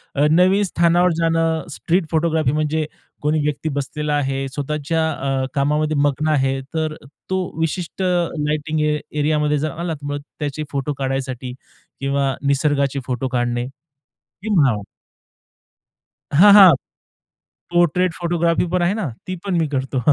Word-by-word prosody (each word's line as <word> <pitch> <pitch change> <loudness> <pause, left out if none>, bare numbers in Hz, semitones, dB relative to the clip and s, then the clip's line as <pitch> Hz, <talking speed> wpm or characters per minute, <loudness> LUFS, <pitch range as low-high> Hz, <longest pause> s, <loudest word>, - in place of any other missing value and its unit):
अ, 145 - +3
नवीन 185 +4 +4
स्थानावर 175 -1 +3
जाणं, 165 0 +1
street 170 +4 0
photography, 160 -4 +1
म्हणजे 155 +1 0 0.4
कोणी 150 +1 +1
व्यक्ती 150 +1 -2
बसलेला 150 +2 -2
आहे 135 -1 -1
स्वतःच्या 150 +2 -1
अ, 135 -2 -1
कामामध्ये 150 +2 +1
मग्न 145 +1 +1
आहे, 135 -2 +1
तर 155 -1 -1 0.3
तो 190 0 0 0.2
विशिष्ट 165 +3 -3
लाइटिंग 155 -4 -1
ए 150 0 +1 0.2
एरियामध्ये 150 0 +1
जर 155 +1 -2
आला 170 +1 -4
तर 145 -1 -9
मग 145 - -3 0.2
त्याचे 150 +1 -3
फोटो 140 +1 -2
काढण्यासाठी, 130 -2 -3 0.5
किंवा 140 0 0
निसर्गाचे 140 -1 +1
फोटो 130 0 -2
काढणे, 120 0 -1 0.8
किंवा 155 - +3 1.6
हां, 205 +1 +9
हां. 195 -5 +9 1.0
पोर्ट्रेट 175 +1 +2
फोटोग्राफी 170 0 0
पण 180 -1 +1
आहे 175 +3 +2
ना, 210 -9 -2 0.2
ती 185 0 -4
पण 190 -3 -1
मी 160 -2 +1
करतो. 135 -1 -2
150 Hz, 135 wpm, -20 LUFS, 140-170 Hz, 1.6 s, हां